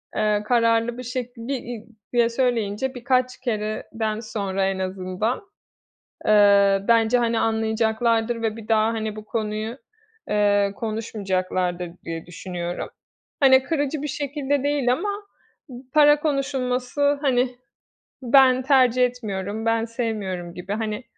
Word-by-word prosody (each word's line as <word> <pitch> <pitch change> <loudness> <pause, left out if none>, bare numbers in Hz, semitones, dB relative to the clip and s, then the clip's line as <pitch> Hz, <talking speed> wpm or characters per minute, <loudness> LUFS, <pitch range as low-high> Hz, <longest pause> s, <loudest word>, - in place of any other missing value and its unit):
Eee, 210 -1 +1
kararlı 230 0 +2
bir 250 - -6
şekil, 245 0 -4
bir 275 - -1
i 230 -2 -7 0.3
diye 235 -1 +3
söyleyince 240 0 -1
birkaç 255 0 0
kereden 215 -2 -3
sonra 200 -4 -2
en 195 -1 -2
azından, 185 +4 -2 0.8
eee, 200 -2 +5
bence, 230 +1 +4
hani, 230 -1 +1
anlayacaklardır 225 +1 +1
ve 225 -1 -1
bir 220 -2 -10
daha, 220 -1 +3
hani, 220 -1 -3
bu 215 0 -9
konuyu, 215 +2 -3 0.5
eee, 205 -1 +2
konuşmayacaklardır 185 -5 -2
diye 165 -1 -5
düşünüyorum. 175 0 -5 0.5
Hani, 265 -2 +6
kırıcı 290 -1 -1
bir 300 - -3
şekilde 285 0 -2
değil 280 -4 +2
ama, 385 +10 -2 0.6
"P - - -10 0.2
para 295 -1 +6
konuşulması, 275 -1 0
hani, 255 -3 +1 0.7
ben 255 +1 +5
tercih 255 -2 +4
etmiyorum, 215 -3 -4
ben 225 0 +1
sevmiyorum." 210 -7 -4
gibi, 180 +3 -5
hani, 215 +2 -3
225 Hz, 125 wpm, -23 LUFS, 210-255 Hz, 0.8 s, Hani